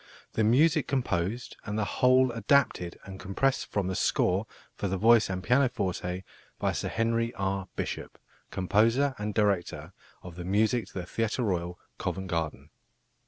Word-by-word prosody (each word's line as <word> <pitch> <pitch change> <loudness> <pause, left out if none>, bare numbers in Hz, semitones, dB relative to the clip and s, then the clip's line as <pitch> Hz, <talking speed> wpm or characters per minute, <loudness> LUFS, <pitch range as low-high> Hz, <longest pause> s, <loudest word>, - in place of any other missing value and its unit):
The 110 - +1
music 150 +7 +4
composed 120 -4 -2
and 105 0 -4
the 110 - +1
whole 130 +6 +4
adapted 115 -6 +1
and 95 -1 -9
compressed 130 +8 0
from 100 -2 0
the 95 - -1
score 95 +3 +1 0.3
for 100 - -3
the 95 0 -1
voice 115 +2 +5
and 95 -1 -3
pianoforte 100 -8 0 0.3
by - - 0
Sir - - -3
Henry 115 0 0
R. 95 -1 -2
Bishop, - - -4 0.3
Composer 115 +9 +2
and 105 0 -3
Director 90 -6 0 0.3
of 90 -1 -10
the 90 - -5
Music 110 +5 +1
to - - -17
the 90 -2 -4
Theatre 115 +6 -1
Royal, 90 -4 -1 0.2
Covent 95 +1 -3
Garden." 80 -3 -3
105 Hz, 155 wpm, -28 LUFS, 90-120 Hz, 0.3 s, voice